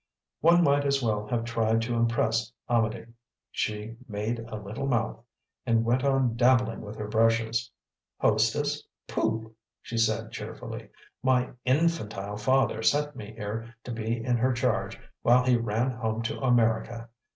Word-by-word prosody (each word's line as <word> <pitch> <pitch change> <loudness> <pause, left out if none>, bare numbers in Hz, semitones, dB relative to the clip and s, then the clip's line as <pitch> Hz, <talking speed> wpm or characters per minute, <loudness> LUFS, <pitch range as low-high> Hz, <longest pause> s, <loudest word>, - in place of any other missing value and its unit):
One 170 +2 +5
might 145 -1 +3
as 140 -1 +1
well 105 -2 0
have 115 0 -1
tried 115 -1 +1
to 120 +1 -2
impress 115 -1 +1 0.2
Amedee. 115 -3 +1 0.5
She 105 +2 -3
"made 110 +2 -2
a 115 -1 -7
little 105 +6 -5
mouth" 115 -2 -1 0.4
and 115 -2 +2
went 125 +3 +2
on 135 -4 +2
dabbling 120 -1 +3
with 105 0 -8
her 105 -1 -5
brushes. 115 +1 +2 0.5
"Hostess? 140 +8 +2 0.3
Pooh!" 110 0 -1 0.3
she 115 - -4
said 110 0 +1
cheerfully. - - -7 0.3
"My 130 -1 +2
INFANTILE 125 -9 0
father 130 +1 +2
sent 145 +4 +2
me 105 0 -8
here 115 +2 -5
to 125 - -6
be 115 0 -2
in 125 -1 +2
her 130 +3 +2
charge 120 - -1 0.2
while 125 +1 +5
he 125 -1 +4
ran 115 +2 0
home 115 -2 -2
to 115 - -3
America. 115 -2 +1
115 Hz, 150 wpm, -28 LUFS, 110-125 Hz, 0.5 s, One